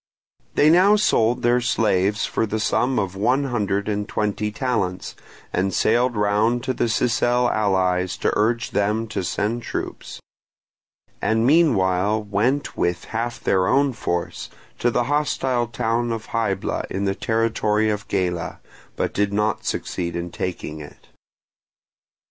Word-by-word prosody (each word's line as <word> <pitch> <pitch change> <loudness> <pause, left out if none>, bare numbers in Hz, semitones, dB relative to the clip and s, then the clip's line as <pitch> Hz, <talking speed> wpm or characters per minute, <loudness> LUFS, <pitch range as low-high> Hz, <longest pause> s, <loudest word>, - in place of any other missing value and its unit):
They 150 +1 +5
now 190 +5 +6
sold 120 - +2
their 120 +1 +3
slaves 105 -3 +1
for 115 - -1
the 110 +1 -2
sum 125 +4 +1
of 95 -1 -1
one 125 +8 +1
hundred 100 -6 -1
and 105 -1 -2
twenty 105 0 -1
talents, 105 -7 -2 0.4
and 95 +2 +1
sailed 120 +2 +2
round 105 +4 +1
to 130 - -1
their 120 - 0
Sicel 120 +1 +2
allies 95 -3 +1
to - - 0
urge 115 +2 +1
them 105 +3 0
to 105 - -3
send 105 +6 -1
troops; - - -6 1.0
and 110 +1 +1
meanwhile 105 - +3
went 110 +8 0
with 85 0 -1
half 115 +1 -2
their 95 -1 +2
own 140 +3 +3
force 85 -6 -3 0.3
to 120 - +2
the 120 0 +1
hostile 130 -3 0
town 120 +1 -1
of 115 -1 -5
Hybla 105 -4 -1
in 100 +1 -2
the 95 - +1
territory 110 -1 +1
of 105 0 -4
Gela, 90 -4 -2 0.4
but - - -2
did 100 0 0
not 105 +1 0
succeed 85 -1 -3
in 85 0 -4
taking 85 -4 -5
it. 75 -1 -13
110 Hz, 145 wpm, -22 LUFS, 100-120 Hz, 1.0 s, now